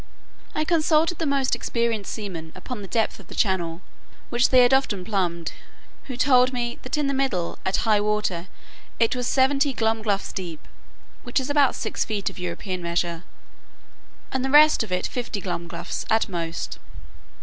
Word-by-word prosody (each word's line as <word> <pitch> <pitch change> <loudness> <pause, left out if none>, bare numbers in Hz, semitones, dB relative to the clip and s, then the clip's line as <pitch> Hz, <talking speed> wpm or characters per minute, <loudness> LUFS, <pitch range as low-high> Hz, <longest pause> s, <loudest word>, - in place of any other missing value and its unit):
I 310 - +1
consulted 320 0 +2
the 325 - 0
most 275 -1 +1
experienced 230 -4 -1
seamen 175 -7 -6
upon 250 -5 -6
the 195 - -7
depth 220 +4 0
of - - -14
the - - -9
channel, 175 -4 0 0.5
which 240 +1 +3
they 255 -1 +7
had 245 +2 +4
often 210 -9 +1
plumbed; 175 -5 -1 0.5
who 255 -3 -6
told 255 -1 +5
me, 240 -1 -3
that 255 +4 -3
in 300 - +1
the 275 - 0
middle, 260 -11 -1
at 190 - +1
high 215 -2 +4
water, 210 -4 -1 0.5
it 230 +1 +3
was 250 -1 -2
seventy 275 +1 +3
glumgluffs 220 -3 0
deep, 170 -5 -6 0.5
which 245 +3 0
is 265 +2 -3
about 285 -2 +4
six - - -2
feet 210 -3 -2
of - - -12
European 180 +1 -4
measure; 170 0 -2 1.1
and 260 -1 -1
the 265 - 0
rest 300 +2 +7
of 220 -4 -4
it 180 - 0
fifty 240 -4 -3
glumgluffs 175 -2 -4
at 220 +1 +3
most. 170 -3 -4
225 Hz, 170 wpm, -24 LUFS, 185-265 Hz, 1.1 s, they